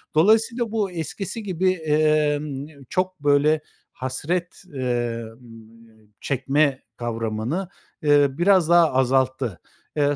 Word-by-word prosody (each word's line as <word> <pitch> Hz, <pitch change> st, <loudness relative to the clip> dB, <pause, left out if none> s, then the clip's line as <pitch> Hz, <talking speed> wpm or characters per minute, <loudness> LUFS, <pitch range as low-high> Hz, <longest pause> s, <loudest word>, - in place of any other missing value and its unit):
Dolayısıyla 225 Hz, +6 st, +3 dB
bu 210 Hz, -4 st, -1 dB
eskisi 180 Hz, +6 st, -5 dB
gibi, 185 Hz, -1 st, +1 dB
emm, 150 Hz, -3 st, 0 dB, 0.2 s
çok, 185 Hz, -1 st, -1 dB
böyle, 145 Hz, +2 st, +3 dB, 0.3 s
hasret, 165 Hz, +9 st, -3 dB
emm, 115 Hz, -3 st, -6 dB
çekme 135 Hz, +1 st, +1 dB
kavramını, 115 Hz, -, -3 dB, 0.3 s
eee, 145 Hz, -2 st, +5 dB
biraz 180 Hz, -1 st, +4 dB
daha 170 Hz, -3 st, +5 dB
azalttı. 130 Hz, -5 st, +1 dB, 0.4 s
Eee, 145 Hz, -1 st, +2 dB
145 Hz, 95 wpm, -23 LUFS, 125-175 Hz, 0.4 s, eee